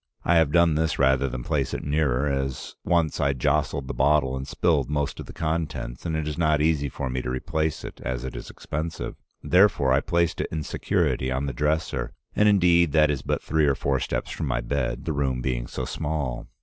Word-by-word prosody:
I 85 Hz, -, +4 dB
have 80 Hz, -3 st, +3 dB
done 85 Hz, 0 st, +4 dB
this 80 Hz, +1 st, 0 dB
rather 70 Hz, 0 st, +3 dB
than -, -, -5 dB
place -, -, -1 dB
it -, -, -5 dB
nearer, 70 Hz, -3 st, +1 dB
as 70 Hz, -2 st, -3 dB
once 85 Hz, -3 st, +1 dB
I 70 Hz, 0 st, +2 dB
jostled 65 Hz, +1 st, 0 dB
the -, -, -3 dB
bottle 70 Hz, -1 st, +2 dB
and 65 Hz, +1 st, -5 dB
spilled 75 Hz, -6 st, +1 dB
most 75 Hz, -1 st, -1 dB
of -, -, -7 dB
the -, -, -8 dB
contents, 80 Hz, -4 st, -3 dB
and 80 Hz, -, -1 dB
it 80 Hz, -1 st, -2 dB
is 75 Hz, +2 st, -4 dB
not 75 Hz, -3 st, +3 dB
easy 75 Hz, -2 st, +1 dB
for 70 Hz, -, -4 dB
me 65 Hz, 0 st, -2 dB
to 65 Hz, -, -4 dB
replace 80 Hz, +4 st, -2 dB
it, -, -, -9 dB
as 65 Hz, -1 st, -3 dB
it 65 Hz, -, -6 dB
is -, -, -7 dB
expensive. 80 Hz, +2 st, -5 dB, 0.3 s
Therefore 90 Hz, -8 st, +4 dB
I 70 Hz, -, +3 dB
placed 85 Hz, -2 st, 0 dB
it -, -, -2 dB
in 80 Hz, -1 st, -2 dB
security 65 Hz, -2 st, 0 dB
on 65 Hz, +2 st, -1 dB
the 70 Hz, -, -3 dB
dresser, 75 Hz, -3 st, -1 dB, 0.2 s
and, 105 Hz, 0 st, +5 dB
indeed, 85 Hz, -5 st, +4 dB
that 75 Hz, -1 st, +5 dB
is 70 Hz, -3 st, -2 dB
but -, -, -2 dB
three 80 Hz, -2 st, +2 dB
or 70 Hz, -, +3 dB
four 70 Hz, -1 st, 0 dB
steps -, -, -3 dB
from -, -, -3 dB
my -, -, 0 dB
bed, 65 Hz, +2 st, -2 dB
the 80 Hz, -, -1 dB
room 70 Hz, -3 st, 0 dB
being -, -, -2 dB
so -, -, -4 dB
small. 75 Hz, -5 st, -3 dB
75 Hz, 220 wpm, -25 LUFS, 65-80 Hz, 0.3 s, and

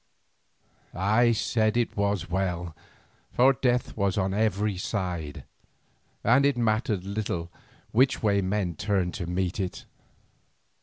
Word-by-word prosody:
I 110 Hz, +6 st, +3 dB
said 110 Hz, -1 st, +1 dB
that -, -, +3 dB
it 120 Hz, -, -1 dB
was 100 Hz, -4 st, 0 dB
well, 90 Hz, -2 st, -2 dB, 0.6 s
for 130 Hz, +2 st, +5 dB
death 125 Hz, -1 st, 0 dB
was 100 Hz, -2 st, 0 dB
on 95 Hz, -1 st, 0 dB
every 105 Hz, -1 st, +1 dB
side, 90 Hz, -6 st, -4 dB, 0.8 s
and 125 Hz, +5 st, +4 dB
it 140 Hz, -2 st, +2 dB
mattered 110 Hz, -4 st, 0 dB
little 95 Hz, -4 st, -3 dB, 0.4 s
which 130 Hz, +3 st, +3 dB
way 100 Hz, -2 st, +3 dB
men 95 Hz, -2 st, -1 dB
turned 95 Hz, -1 st, 0 dB
to 90 Hz, -4 st, -5 dB
meet 90 Hz, +1 st, -2 dB
it. 95 Hz, -2 st, -4 dB
100 Hz, 130 wpm, -27 LUFS, 90-110 Hz, 0.8 s, for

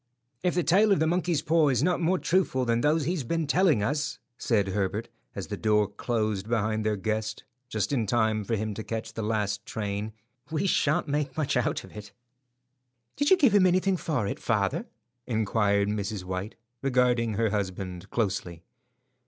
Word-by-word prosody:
"If 180 Hz, -, 0 dB
the 175 Hz, -, +2 dB
tale 200 Hz, +7 st, +4 dB
about 195 Hz, -, +4 dB
the 160 Hz, -, +3 dB
monkey's 170 Hz, -2 st, 0 dB
paw 160 Hz, -1 st, +3 dB
is 130 Hz, -1 st, +1 dB
not 180 Hz, +1 st, +1 dB
more 175 Hz, +3 st, +2 dB
truthful 170 Hz, -9 st, +1 dB
than 115 Hz, 0 st, +1 dB
those 150 Hz, +2 st, +2 dB
he 170 Hz, -, 0 dB
has 175 Hz, -7 st, -2 dB
been 165 Hz, +6 st, -1 dB
telling 150 Hz, -, +3 dB
us," 145 Hz, +5 st, -1 dB, 0.2 s
said 105 Hz, -5 st, +1 dB
Herbert, 100 Hz, +2 st, -2 dB, 0.3 s
as -, -, -4 dB
the -, -, -5 dB
door 105 Hz, -1 st, +2 dB
closed 110 Hz, -1 st, -2 dB
behind 110 Hz, -1 st, 0 dB
their 105 Hz, 0 st, +1 dB
guest, 110 Hz, +2 st, -3 dB, 0.3 s
just 110 Hz, +3 st, -1 dB
in 115 Hz, -6 st, 0 dB
time 110 Hz, -1 st, +1 dB
for 115 Hz, +3 st, -1 dB
him 110 Hz, 0 st, -2 dB
to 110 Hz, -, -6 dB
catch 115 Hz, 0 st, -5 dB
the 115 Hz, -, -4 dB
last 105 Hz, -2 st, -1 dB
train, 105 Hz, 0 st, -4 dB, 0.4 s
"we 160 Hz, +4 st, -1 dB
sha'nt 150 Hz, -5 st, +2 dB
make 145 Hz, -1 st, -2 dB
much 155 Hz, -3 st, 0 dB
out 125 Hz, -, 0 dB
of -, -, -14 dB
it." 105 Hz, -1 st, -9 dB, 1.0 s
"Did 285 Hz, +1 st, +1 dB
you 380 Hz, -, +7 dB
give 265 Hz, -, +4 dB
him 195 Hz, -3 st, +6 dB
anything 185 Hz, +1 st, +2 dB
for 150 Hz, -, -1 dB
it, 100 Hz, -, -3 dB
father?" 100 Hz, -4 st, 0 dB, 0.4 s
inquired 105 Hz, -3 st, +1 dB
Mrs. 105 Hz, -1 st, -3 dB
White, 95 Hz, +3 st, -4 dB, 0.3 s
regarding 125 Hz, -4 st, +2 dB
her 110 Hz, 0 st, +1 dB
husband 95 Hz, -2 st, -4 dB
closely. 95 Hz, -6 st, -2 dB
115 Hz, 185 wpm, -27 LUFS, 105-155 Hz, 1.0 s, you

